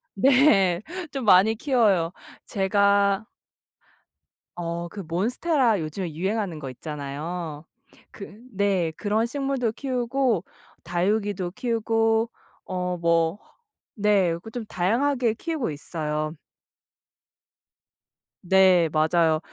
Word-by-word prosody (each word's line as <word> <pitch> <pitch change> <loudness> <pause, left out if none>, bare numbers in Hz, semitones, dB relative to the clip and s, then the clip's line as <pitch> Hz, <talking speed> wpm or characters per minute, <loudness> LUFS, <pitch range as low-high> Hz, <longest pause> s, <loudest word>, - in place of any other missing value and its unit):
네. 200 - +4 0.3
좀 270 -4 -4
많이 205 +3 +6
키워요. 210 - +2 0.3
제가 200 +1 +2 1.3
어 170 0 -4
그 205 - -9
몬스테라 225 - +1
요즘에 160 +2 -4
유행하는 190 0 -2
거 135 -3 -6
있잖아요. 150 +3 -6 0.5
그 205 +1 -11
네. 195 -4 +1
그런 215 +1 0
식물도 270 -2 -1
키우고 250 -5 0 0.4
다육이도 185 +1 -1
키우고 225 -1 +1 0.4
어 180 -1 -3
뭐 170 +2 +1 0.6
네. 200 -5 +2
그 220 - -10
좀 240 -1 -5
다양하게 235 +6 +1
키우고 300 - -3
있어요. 155 +1 -4 2.1
네. 185 -2 +5
맞아요. 160 +1 +2
195 Hz, 195 characters per minute, -25 LUFS, 170-225 Hz, 2.1 s, 많이